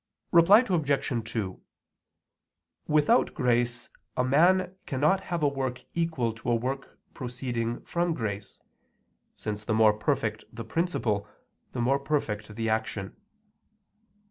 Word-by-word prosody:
Reply 195 Hz, +8 st, +7 dB
Obj. 140 Hz, -, 0 dB
2: 100 Hz, -5 st, -3 dB, 1.3 s
Without 155 Hz, +11 st, +3 dB
grace 120 Hz, -3 st, 0 dB, 0.3 s
a 125 Hz, -, +3 dB
man 180 Hz, +8 st, +3 dB
cannot 150 Hz, +8 st, +2 dB
have 175 Hz, -3 st, -2 dB
a -, -, +5 dB
work 130 Hz, -3 st, -3 dB
equal 160 Hz, -9 st, 0 dB
to 115 Hz, +2 st, -5 dB
a 120 Hz, -, +4 dB
work 130 Hz, +4 st, -4 dB, 0.2 s
proceeding 120 Hz, -2 st, -3 dB
from 170 Hz, -1 st, -1 dB
grace, 105 Hz, -5 st, -5 dB, 0.8 s
since 105 Hz, -1 st, -5 dB
the 110 Hz, 0 st, 0 dB
more 110 Hz, -1 st, +6 dB
perfect 110 Hz, -1 st, -1 dB
the 115 Hz, 0 st, -7 dB
principle, 115 Hz, -, -1 dB, 0.5 s
the 120 Hz, -, -2 dB
more 135 Hz, +4 st, +2 dB
perfect 110 Hz, -8 st, -2 dB
the 115 Hz, 0 st, -2 dB
action. 110 Hz, -3 st, -2 dB
125 Hz, 120 wpm, -28 LUFS, 110-150 Hz, 1.3 s, Reply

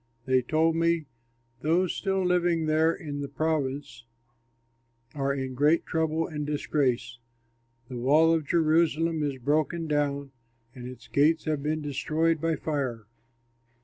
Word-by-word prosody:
They 130 Hz, -1 st, +3 dB
told 160 Hz, +5 st, +1 dB
me, 165 Hz, -1 st, +1 dB, 0.6 s
"Those 170 Hz, +3 st, +1 dB
still 190 Hz, -1 st, -1 dB
living 175 Hz, -2 st, +2 dB
there 155 Hz, +1 st, +3 dB
in 145 Hz, -5 st, -6 dB
the 140 Hz, -, -3 dB
province 145 Hz, -3 st, -2 dB, 1.1 s
are 140 Hz, -1 st, -1 dB
in 130 Hz, -1 st, -3 dB
great 150 Hz, +6 st, +2 dB
trouble 160 Hz, 0 st, 0 dB
and 150 Hz, -3 st, -5 dB
disgrace. 140 Hz, -5 st, -1 dB, 0.7 s
The 125 Hz, -1 st, -6 dB
wall 155 Hz, +6 st, +4 dB
of 160 Hz, -3 st, -1 dB
Jerusalem 165 Hz, 0 st, +2 dB
is 145 Hz, -3 st, -2 dB
broken 155 Hz, +5 st, 0 dB
down 140 Hz, -2 st, -1 dB, 0.4 s
and 125 Hz, -1 st, -8 dB
its 125 Hz, -1 st, -11 dB
gates 155 Hz, +5 st, +2 dB
have 155 Hz, -3 st, -1 dB
been 155 Hz, +1 st, -2 dB
destroyed 155 Hz, +3 st, 0 dB
by 165 Hz, -1 st, +1 dB
fire." 135 Hz, -8 st, -3 dB
155 Hz, 135 wpm, -27 LUFS, 140-165 Hz, 1.1 s, wall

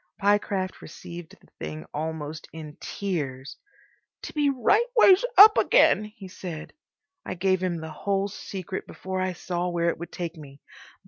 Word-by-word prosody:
Pyecraft 200 Hz, -2 st, 0 dB
received 170 Hz, +1 st, -10 dB
the -, -, -22 dB
thing 75 Hz, -1 st, -6 dB
almost 155 Hz, 0 st, -5 dB
in 155 Hz, -2 st, -9 dB
tears. 145 Hz, -9 st, -4 dB, 0.7 s
"To -, -, -7 dB
be 295 Hz, -2 st, +2 dB
right 280 Hz, -, +3 dB
ways 390 Hz, -2 st, +7 dB
up 420 Hz, +2 st, +10 dB
again—" -, -, +4 dB
he 210 Hz, -2 st, -11 dB
said. 175 Hz, -4 st, -8 dB, 0.5 s
I 185 Hz, -, -5 dB
gave 185 Hz, +1 st, +1 dB
him 180 Hz, -2 st, -1 dB
the 160 Hz, 0 st, -7 dB
whole 195 Hz, +5 st, -1 dB
secret 190 Hz, -1 st, -6 dB
before 190 Hz, 0 st, -4 dB
I 185 Hz, 0 st, -1 dB
saw 175 Hz, 0 st, -3 dB
where 170 Hz, -1 st, +1 dB
it 170 Hz, -, -3 dB
would 170 Hz, -, -7 dB
take 170 Hz, -1 st, -5 dB
me. 140 Hz, -2 st, -12 dB
180 Hz, 155 wpm, -26 LUFS, 160-200 Hz, 0.7 s, up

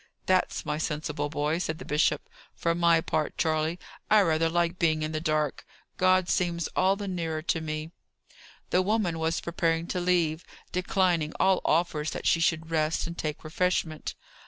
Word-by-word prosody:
"That's 185 Hz, 0 st, +1 dB
my 150 Hz, +1 st, -2 dB
sensible 150 Hz, -1 st, -2 dB
boy!" 150 Hz, +2 st, -1 dB
said 160 Hz, -3 st, -2 dB
the -, -, -9 dB
bishop. 150 Hz, +2 st, +1 dB, 0.3 s
"For 170 Hz, -, 0 dB
my 170 Hz, -1 st, +4 dB
part, 155 Hz, -1 st, -2 dB
Charley, 160 Hz, +1 st, 0 dB, 0.3 s
I 215 Hz, -1 st, +6 dB
rather 165 Hz, -3 st, +2 dB
like 175 Hz, +1 st, 0 dB
being 155 Hz, -2 st, +2 dB
in 155 Hz, -, -2 dB
the 155 Hz, 0 st, -2 dB
dark. 155 Hz, -3 st, 0 dB, 0.3 s
God 185 Hz, -1 st, +3 dB
seems 170 Hz, -3 st, 0 dB
all 190 Hz, +1 st, +3 dB
the 200 Hz, 0 st, -5 dB
nearer 165 Hz, -4 st, -3 dB
to 165 Hz, 0 st, 0 dB
me." 155 Hz, 0 st, -4 dB, 0.8 s
The 180 Hz, -, +4 dB
woman 190 Hz, -4 st, 0 dB
was 160 Hz, +1 st, 0 dB
preparing 165 Hz, -1 st, 0 dB
to 180 Hz, -, -1 dB
leave, 175 Hz, -2 st, +1 dB, 0.3 s
declining 180 Hz, -4 st, +1 dB
all 190 Hz, -1 st, +3 dB
offers 155 Hz, -2 st, +1 dB
that -, -, -6 dB
she 165 Hz, -, +4 dB
should 165 Hz, 0 st, 0 dB
rest 155 Hz, 0 st, +1 dB
and 170 Hz, -, -6 dB
take 155 Hz, -3 st, -4 dB
refreshment. 160 Hz, -1 st, -1 dB
165 Hz, 170 wpm, -28 LUFS, 155-175 Hz, 0.8 s, I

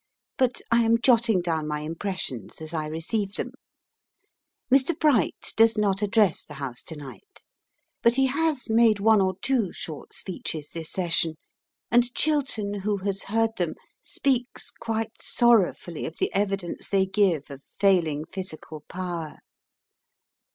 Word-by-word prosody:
But 255 Hz, -2 st, +1 dB
I 235 Hz, -, +5 dB
am 230 Hz, 0 st, +3 dB
jotting 230 Hz, -6 st, +4 dB
down 160 Hz, -3 st, -1 dB
my 150 Hz, 0 st, -2 dB
impressions 160 Hz, -, -4 dB
as 160 Hz, +1 st, -6 dB
I 155 Hz, -2 st, -2 dB
receive 195 Hz, +6 st, -3 dB
them. 250 Hz, -, -3 dB, 1.2 s
Mr. 275 Hz, +4 st, +4 dB
Bright 280 Hz, -, +2 dB
does 225 Hz, 0 st, +5 dB
not 200 Hz, -2 st, +1 dB
address 210 Hz, -3 st, +2 dB
the 150 Hz, -, -11 dB
House 135 Hz, -4 st, -4 dB
to 160 Hz, -, -5 dB
night, 150 Hz, -, -12 dB, 0.6 s
but 235 Hz, 0 st, +4 dB
he 270 Hz, 0 st, +4 dB
has 290 Hz, 0 st, 0 dB
made 225 Hz, -2 st, +4 dB
one 215 Hz, 0 st, +5 dB
or 190 Hz, -1 st, +1 dB
two 245 Hz, -8 st, +1 dB
short 155 Hz, -3 st, -8 dB
speeches 155 Hz, -5 st, -4 dB
this 165 Hz, -2 st, -5 dB
Session, 170 Hz, -3 st, 0 dB, 0.6 s
and 240 Hz, +1 st, +4 dB
Chiltern, 255 Hz, -10 st, +1 dB
who 205 Hz, +1 st, -1 dB
has 195 Hz, 0 st, -2 dB
heard 225 Hz, +2 st, +1 dB
them, 175 Hz, -3 st, -1 dB, 0.3 s
speaks 255 Hz, -3 st, -1 dB
quite 225 Hz, -1 st, -4 dB
sorrowfully 210 Hz, -8 st, +2 dB
of 165 Hz, -, -9 dB
the -, -, -1 dB
evidence 195 Hz, -3 st, -1 dB
they 195 Hz, -1 st, +3 dB
give 190 Hz, -7 st, +1 dB
of 140 Hz, -1 st, -9 dB
failing 170 Hz, -7 st, +1 dB
physical 165 Hz, -5 st, -6 dB
power. 175 Hz, -4 st, -5 dB
195 Hz, 145 wpm, -26 LUFS, 165-230 Hz, 1.2 s, I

